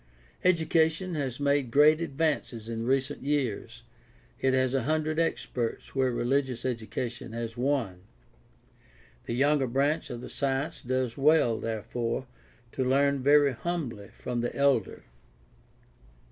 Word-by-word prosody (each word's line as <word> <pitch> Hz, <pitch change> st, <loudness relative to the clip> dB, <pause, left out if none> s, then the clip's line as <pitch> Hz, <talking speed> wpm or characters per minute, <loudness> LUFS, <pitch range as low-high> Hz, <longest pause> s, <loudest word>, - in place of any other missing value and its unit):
Education 165 Hz, 0 st, +2 dB
has 135 Hz, -5 st, -3 dB
made 140 Hz, -2 st, +1 dB
great 150 Hz, +5 st, +5 dB
advances 140 Hz, -7 st, -1 dB
in 115 Hz, 0 st, -4 dB
recent 135 Hz, +2 st, 0 dB
years; 125 Hz, -4 st, -2 dB, 0.6 s
it 135 Hz, -, +2 dB
has 130 Hz, -1 st, +1 dB
a 135 Hz, -, +2 dB
hundred 155 Hz, +1 st, 0 dB
experts 125 Hz, -7 st, -2 dB
where 130 Hz, -1 st, +2 dB
religious 130 Hz, +1 st, 0 dB
education 120 Hz, 0 st, -4 dB
has 115 Hz, -1 st, -4 dB
one. 120 Hz, -8 st, -1 dB, 1.3 s
The 115 Hz, -, -2 dB
younger 140 Hz, +1 st, +3 dB
branch 140 Hz, +6 st, 0 dB
of 120 Hz, -1 st, -6 dB
the -, -, -8 dB
science 140 Hz, +4 st, -2 dB
does 130 Hz, 0 st, -2 dB
well, 135 Hz, -6 st, +4 dB
therefore, 115 Hz, +3 st, -3 dB, 0.5 s
to 130 Hz, -, -1 dB
learn 140 Hz, +1 st, +2 dB
very 145 Hz, +1 st, +5 dB
humbly 125 Hz, -8 st, -4 dB
from 120 Hz, -1 st, -4 dB
the 120 Hz, -, -3 dB
elder. 140 Hz, -7 st, +1 dB
135 Hz, 125 wpm, -28 LUFS, 120-145 Hz, 1.3 s, great